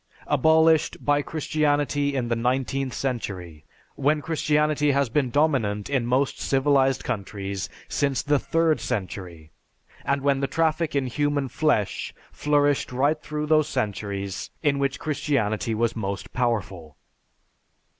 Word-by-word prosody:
Abolished 160 +2 +3
by 145 0 +3
Christianity 145 -2 0
in 125 -3 -1
the 115 - 0
nineteenth 130 +2 -1
century, 95 - -4 0.3
when 150 +3 +1
Christianity 150 -1 +1
has 140 -2 +1
been 130 +1 +1
dominant 120 -7 +1
in 130 -4 +1
most 130 +2 +1
civilized 135 -1 +2
countries 100 -4 -4 0.2
since 140 -2 0
the 145 -1 +2
third 165 0 +1
century, 90 -5 -5 0.5
and 140 0 0
when 140 -1 +2
the 135 - 0
traffic 160 0 0
in 140 -2 +1
human 145 +1 -1
flesh 145 -11 0 0.2
flourished 145 -2 +1
right 145 +5 +1
through 150 0 -3
those 155 -1 +3
centuries 100 -2 -3
in 140 -2 +2
which 140 -1 0
Christianity 115 -8 -1
was 115 +1 0
most 100 -3 -4
powerful! 100 - -2
135 Hz, 125 wpm, -25 LUFS, 110-150 Hz, 0.5 s, Abolished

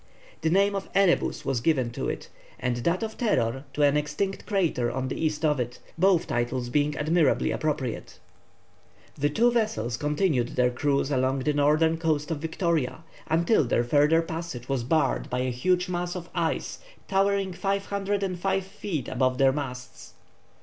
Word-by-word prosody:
The 160 - +1
name 200 +4 +3
of 195 -1 -4
Erebus 195 -3 +2
was 130 -3 0
given 130 -5 +1
to - - -3
it, - - -5 0.3
and 125 0 -1
that 170 - 0
of 220 0 -5
Terror 135 - 0
to 150 - +1
an 145 0 +4
extinct 150 +7 -2
crater 170 - +1
on 130 +1 -3
the - - -3
east 155 +1 -1
of 150 -3 +2
it, 120 0 -3 0.2
both 180 0 +3
titles 120 +1 -2
being 145 +2 +1
admirably 155 -1 +2
appropriate. 150 -6 -3 1.0
The 145 +1 0
two 235 +10 +3
vessels 125 - -1
continued 150 -3 0
their 125 -1 +3
cruise 140 +2 0
along 130 0 +1
the 150 - +1
northern 155 +3 +3
coast 155 -1 0
of 155 - -2
Victoria, 160 -2 -1 0.2
until 170 +5 +3
their 120 -1 +1
further 150 +6 +3
passage 165 -7 -6
was 135 -3 -1
barred 155 +6 +1
by 125 0 -1
a 130 0 -1
huge 180 +9 +1
mass 175 0 -3
of 175 -1 -7
ice 165 -3 -2 0.3
towering 195 -1 +1
505 195 -1 -1
feet 170 - -5
above 130 0 0
their 135 0 +5
masts. 125 -3 -7
150 Hz, 165 wpm, -26 LUFS, 130-180 Hz, 1.0 s, their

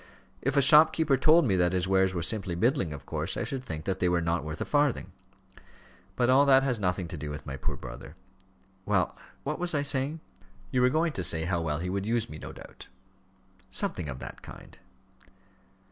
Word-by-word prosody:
If 135 +3 -1
a 140 - +6
shopkeeper 150 +1 +6
told 155 +5 +5
me 100 -6 +2
that 90 0 +2
his 90 0 0
wares 95 0 +3
were 85 - -2
simply 95 -2 -2
middling, 110 - +1
of 75 -2 -8
course, - - -3
I - - -1
should 135 -2 -4
think 80 -9 -6
that 95 -1 -2
they 90 - +2
were 90 -1 +2
not 85 -1 -1
worth 75 0 -6
a - - -2
farthing. 145 -3 +1 1.0
But 120 - +2
all 130 +2 +6
that 135 -1 +6
has 125 -4 0
nothing 90 -2 -1
to 85 - -6
do 75 0 -5
with 75 0 -7
my 70 -2 -5
poor 65 - -3
brother. 75 - -10 0.7
Well, 95 -4 0 0.3
what 150 +3 -3
was 175 -1 -2
I 145 - +1
saying?" 140 +2 -1 0.5
"You 125 - +2
were 125 - +5
going 160 +3 +1
to 90 - -2
tell 80 - +1
me - - -2
how 90 -1 0
well 75 -3 -1
he 90 +3 -3
would 100 +1 -2
use 115 -4 0
me, 75 - -8
no - - -8
doubt." - - -13 0.8
"Something 85 -5 -3
of 65 - -5
that - - -9
kind." - - -13
95 Hz, 215 wpm, -28 LUFS, 85-135 Hz, 1.0 s, a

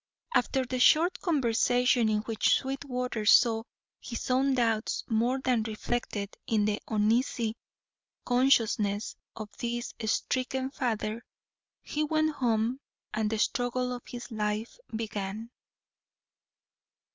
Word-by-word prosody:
After 260 +1 +2
the 255 +1 -3
short 330 +8 +5
conversation 245 - +2
in 210 -1 +1
which 220 0 +2
Sweetwater 250 -4 -3
saw 225 +1 +5 0.4
his 235 +1 -5
own 265 +1 +3
doubts 225 -3 0
more 235 +3 +1
than 255 -3 +1
reflected 215 -2 -3
in 215 -2 +2
the 210 0 -1
uneasy 225 +1 +1 0.7
consciousness 225 -5 +2 0.2
of 215 -2 -8
this 240 0 -3
stricken 260 +3 -1
father, 230 -4 -2 0.6
he 300 - -2
went 310 0 +1
home 235 +1 +1 0.3
and 215 0 0
the 220 - -1
struggle 250 +3 0
of 245 - -6
his 245 0 -8
life 215 +1 -2
began. 220 0 -4
235 Hz, 110 wpm, -29 LUFS, 220-255 Hz, 0.7 s, short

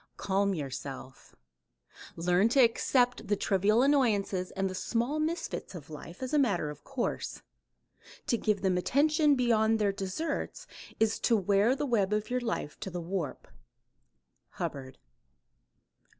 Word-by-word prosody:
Calm 200 0 +1
yourself. 135 -3 -7 0.8
"Learn 180 +5 +2
to 270 - +2
accept 245 +1 +3
the 205 - +2
trivial 205 +4 +2
annoyances 210 -10 +2
and 195 0 -2
the 185 - -4
small 240 +9 -1
misfits 315 - -3
of 155 -3 -10
life 170 - -9
as 260 - -4
a 300 - +4
matter 190 - +1
of 150 - -12
course. 270 -3 -3 0.8
To - - +1
give 210 -3 0
them 185 -2 +2
attention 300 - +3
beyond 225 -3 +3
their 210 -2 +2
deserts 195 - -4 0.3
is 220 0 +2
to 230 - +3
wear 205 +5 +3
the 295 +2 -2
web 210 -6 +1
of 210 +3 -2
your 250 0 0
life 225 -10 -3
to - - -5
the 175 -1 -5
warp." 170 -3 -4 1.1
Hubbard. 130 -2 -5
210 Hz, 140 wpm, -30 LUFS, 185-250 Hz, 1.1 s, a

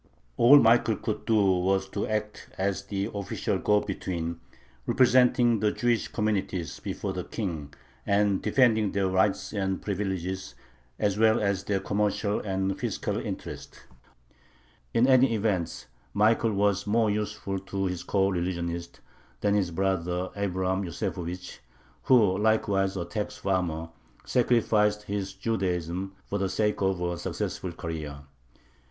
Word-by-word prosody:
All 125 - +8
Michael 115 -2 +4
could 110 - -4
do 115 - +2
was 95 0 +2
to 100 - -3
act 105 -1 -3
as 100 +1 -1
the 100 +1 -3
official 100 -2 -2
go 105 0 +3
between, 85 -4 -4 0.5
representing 125 -2 +4
the 105 0 +2
Jewish 120 -2 0
communities 95 - -2
before - - -4
the - - -4
King 80 -9 -4 0.3
and 100 -1 +2
defending 110 -6 +3
their 100 -1 +1
rights 95 +3 +1
and 95 -2 -1
privileges 95 -2 -3 0.4
as 100 0 0
well 110 0 +5
as 100 -2 0
their 100 -2 0
commercial 105 +1 0
and 95 -1 -2
fiscal - - -2
interests. - - -7 1.1
In 115 +2 +3
any 130 -2 +5
event 100 -6 -1 0.3
Michael 110 +1 +3
was 100 0 +1
more 110 0 +2
useful 105 -2 -3
to 95 0 -3
his 90 -2 -3
coreligionists 85 -3 -1 0.4
than 100 -1 +2
his 100 -4 +1
brother 90 0 -1
Abraham 95 -1 -1
Yosefovich, 90 +1 -5 0.5
who, 105 -7 +4
likewise 100 -3 +1
a 85 - -2
tax 105 +4 -4
farmer, 85 -4 -1 0.4
sacrificed 105 -4 +2
his 100 -2 -3
Judaism 95 -3 -2
for 100 - -3
the 95 -1 0
sake 105 +2 0
of 95 -1 +1
a 85 -1 -2
successful 90 - -3
career. 80 -4 -6
100 Hz, 130 wpm, -27 LUFS, 95-105 Hz, 1.1 s, All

